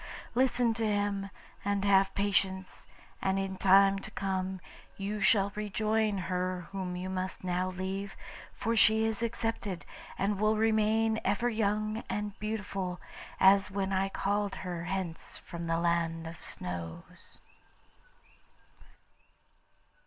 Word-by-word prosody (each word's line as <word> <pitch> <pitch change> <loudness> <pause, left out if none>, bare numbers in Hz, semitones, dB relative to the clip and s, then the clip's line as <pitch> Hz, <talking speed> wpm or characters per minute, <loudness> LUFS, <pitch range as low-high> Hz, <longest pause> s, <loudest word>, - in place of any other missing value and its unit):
Listen 245 -2 +3
to 225 0 -2
him, 205 -1 0 0.3
and 200 0 0
have 195 -1 +4
patience, 190 -1 0 0.3
and 190 0 +1
in 195 0 -2
time 195 +1 +5
to - - -8
come 190 -1 -2 0.4
you 205 +1 -3
shall 200 0 +4
rejoin 215 0 0
her 180 0 -2
whom 185 -2 -3
you 180 +1 -4
must 185 0 -3
now 180 0 0
leave, 190 +2 -4 0.3
for 230 +2 -1
she 220 0 +5
is 225 -1 -1
accepted, 225 -5 -2 0.3
and 200 +1 0
will 215 +1 +3
remain 220 0 +3
ever 205 +5 +1
young 215 0 0
and 210 0 -2
beautiful, 195 -4 -3 0.4
as 195 +1 +6
when 195 0 -1
I 190 +1 +1
called 200 0 -1
her 175 -2 -4
hence 185 -3 -3
from 170 -1 -7
the 165 0 +1
Land 170 -1 0
of 165 +1 -8
Snows. 90 - -7
195 Hz, 125 wpm, -31 LUFS, 185-210 Hz, 0.4 s, as